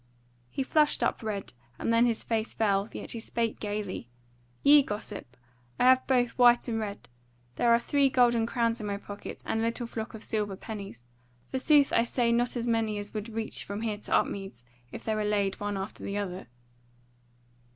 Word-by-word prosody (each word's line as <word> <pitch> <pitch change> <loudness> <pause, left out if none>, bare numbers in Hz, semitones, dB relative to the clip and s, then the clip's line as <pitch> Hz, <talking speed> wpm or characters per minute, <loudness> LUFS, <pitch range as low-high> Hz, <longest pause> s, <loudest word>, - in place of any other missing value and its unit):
He 270 - -2
flushed 300 +2 +2
up - - 0
red, 210 -3 -4 0.2
and 230 - 0
then 230 +1 +5
his 230 -2 -1
face 225 -1 -2
fell; 200 -1 +1
yet - - -6
he 230 - -4
spake 230 0 -2
gaily: 205 - -4 0.5
"Yea, 290 +1 +8
gossip, 205 - -6 0.4
I - - +3
have 255 0 +5
both 245 -2 +3
white 245 0 +6
and 225 -2 -1
red: 205 -2 -5 0.5
there 235 - +3
are 235 - +7
three 280 +3 +2
golden 240 -3 +3
crowns 230 -1 0
in 210 - -4
my 200 -1 -2
pouch, 205 0 -9 0.2
and 225 - -1
a - - 0
little 230 +1 -1
flock 230 0 -6
of 220 - -9
silver 210 -3 -1
pennies: 195 - -8 0.4
forsooth 285 - +3
I 230 - +4
say 240 -1 +1
not 240 +1 +1
as 235 - -2
many 225 -2 +1
as 205 0 -6
would 215 +1 -4
reach 225 0 -3
from 205 +2 -5
here 215 -2 -2
to - - -8
Upmeads, 195 -12 -2 0.3
if - - -8
they 220 - -1
were 215 0 -1
laid 205 -2 0
one 205 -1 -2
after 195 +2 -6
the 200 - -3
other." 190 -5 -4
225 Hz, 195 wpm, -29 LUFS, 205-240 Hz, 0.5 s, Yea